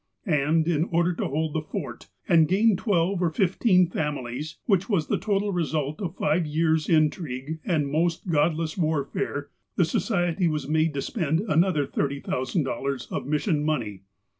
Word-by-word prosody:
And, 155 -1 +2
in 165 -1 +2
order 175 +1 +1
to - - -2
hold 155 +2 -2
the 160 - 0
fort, 155 - -7 0.2
and 160 -2 +5
gain 205 +4 +3
twelve 185 -1 0
or 175 - +2
fifteen 185 +2 +3
families, 150 -3 -4
which 195 -2 +1
was 180 -8 +1
the - - -1
total 205 -1 0
result 155 -3 -2
of 180 -2 -4
five 165 -2 +1
years' 160 0 +1
intrigue 155 -2 0
and 155 -5 0
most 165 +5 0
godless 160 0 +1
warfare, 155 -1 -2 0.3
the 175 - +3
Society 175 0 0
was 150 -4 -2
made 155 0 +1
to 140 - -2
spend 160 -4 0
another 165 -6 +2
$30,000 140 -1 -2
of - - -3
"mission" 150 +1 0
money. 115 -11 -2
160 Hz, 155 wpm, -25 LUFS, 150-175 Hz, 0.3 s, and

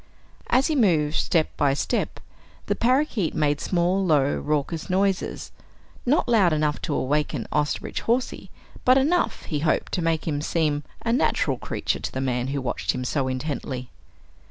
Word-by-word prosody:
As 255 +3 +3
he 315 - +1
moved 165 - +3
step 160 -3 +1
by 140 -1 +2
step, - - -1 0.5
the - - +1
parakeet 250 - +1
made 145 -1 +1
small 180 +2 +1
low, 145 -6 +3
raucous 150 +4 -2
noises 195 +1 0 0.6
not 285 +3 +3
loud 205 -8 +4
enough 150 -1 0
to 145 - -2
awaken 145 -2 0
Osterbridge 150 0 -1
Hawsey, 240 +2 -1 0.3
but 255 +1 +6
enough, 315 +7 +1
he 150 - -3
hoped, 155 +1 0
to 180 - -1
make 165 -1 0
him 145 -2 -1
seem 150 -2 0 0.2
a 230 - +2
natural 255 - +1
creature - - -2
to - - -4
the 130 - -4
man 125 -1 -1
who 140 0 -2
watched 85 -10 -1
him 125 0 -4
so 135 +1 0
intently. 130 -1 -4
155 Hz, 160 wpm, -24 LUFS, 145-195 Hz, 0.6 s, but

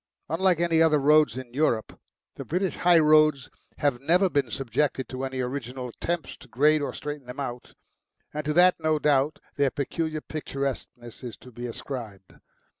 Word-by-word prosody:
Unlike 175 +1 +2
any 165 -2 +3
other 160 -2 +5
roads 150 -3 +4
in 125 -2 -8
Europe 130 -6 0 0.3
the - - -7
British 180 +3 -1
high 175 -1 +5
roads 155 -3 +4 0.3
have 140 -4 0
never 180 +6 +3
been 140 -4 +1
subjected 130 +3 -1
to 130 +1 -5
any 130 -1 -3
organised 125 0 -5 0.2
attempts 170 -1 -2
to - - -16
grade 150 +5 +3
or 140 - -2
straighten 145 -3 -7
them 125 +2 -8
out, 125 -3 -6 0.6
and 150 - -3
to 150 - 0
that 180 +2 +5
no 155 0 +1
doubt 145 0 +2 0.2
their 140 -1 +3
peculiar 155 +3 -3
picturesqueness 135 -6 -5
is 120 -3 -7
to 125 - -15
be 120 +1 -6
ascribed. 110 -6 -7
145 Hz, 170 wpm, -26 LUFS, 125-155 Hz, 0.6 s, other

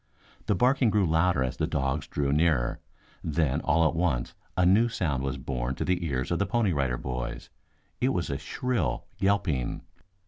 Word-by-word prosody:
The - - +3
barking 125 +3 +3
grew 105 -2 +2
louder 80 -3 +2
as 65 - -3
the - - 0
dogs 70 +1 -1
drew 70 -1 0
nearer, 75 -6 +2 0.4
then 75 -2 0
all 80 -1 +3
at - - -1
once 80 -8 0 0.2
a 90 - +4
new 105 +6 +5
sound 75 - -1
was 70 0 -2
borne 65 0 -3
to - - -3
the 90 -1 0
ears 65 -1 -2
of 85 - +1
the 100 - +1
Pony 110 -4 +1
Rider 65 -4 0
Boys. 60 -1 -5 0.5
It 130 - +2
was 90 - -1
a 70 - -2
shrill 120 - -2
yelping. 95 -10 0
80 Hz, 180 wpm, -28 LUFS, 65-95 Hz, 0.5 s, new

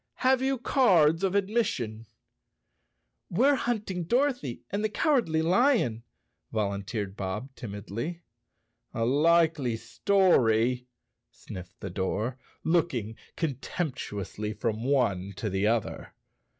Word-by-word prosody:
Have 260 0 +5
you 270 0 +1
cards 185 - +4
of 195 0 +1
admission?" 190 - -1 1.2
"We're 260 +11 +4
hunting 210 -9 -2
Dorothy 245 - 0
and 200 +2 -1
the 215 - +1
Cowardly 210 - +2
Lion," 185 - +3 0.5
volunteered 100 -1 -2
Bob 105 +7 -4
timidly. 115 - -6 0.7
"A 115 -2 +1
likely 150 -2 +3
story," 125 - +2 0.4
sniffed 90 -1 -10
the 95 - -5
door, 110 +7 -2 0.2
looking 160 -10 0 0.2
contemptu¬ 135 - -3
ously 105 +3 -4
from 110 +1 -2
one 100 -8 +1
to 105 +1 -3
the 95 +2 +1
other. 115 -1 -2
130 Hz, 105 wpm, -28 LUFS, -, 1.2 s, Have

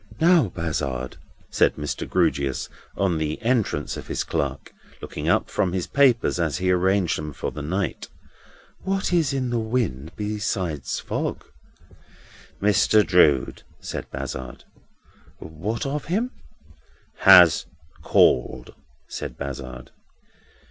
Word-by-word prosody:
"Now, 165 -5 +5
Bazzard," 70 -8 -3 0.3
said - - +3
Mr. 75 -4 -4
Grewgious, 70 -1 0 0.3
on 90 -5 +1
the 75 0 -2
entrance 115 - 0
of - - -9
his - - -2
clerk: 70 -1 -3 0.3
looking - - -4
up - - +2
from 90 -2 -1
his 90 -2 -1
papers 130 -9 +3
as 80 -5 0
he 90 0 +1
arranged 95 0 +2
them 75 -1 -6
for - - -4
the 75 - -7
night: 90 +6 -3 0.7
"what 195 -1 -1
is 165 -5 +2
in 130 -3 -2
the 120 - 0
wind 110 - -2
besides 95 -9 -3
fog?" - - -4 1.1
"Mr. 105 +1 +4
Drood," 75 -8 +3 0.2
said - - -6
Bazzard. 65 -2 -6 0.7
"What 95 - -5
of 145 +1 -3
him?" 220 +9 -1 0.9
"Has 90 -4 +7 0.3
called," 65 0 +2 0.3
said - - -6
Bazzard. 65 -3 -7
90 Hz, 120 wpm, -24 LUFS, 70-110 Hz, 1.1 s, Has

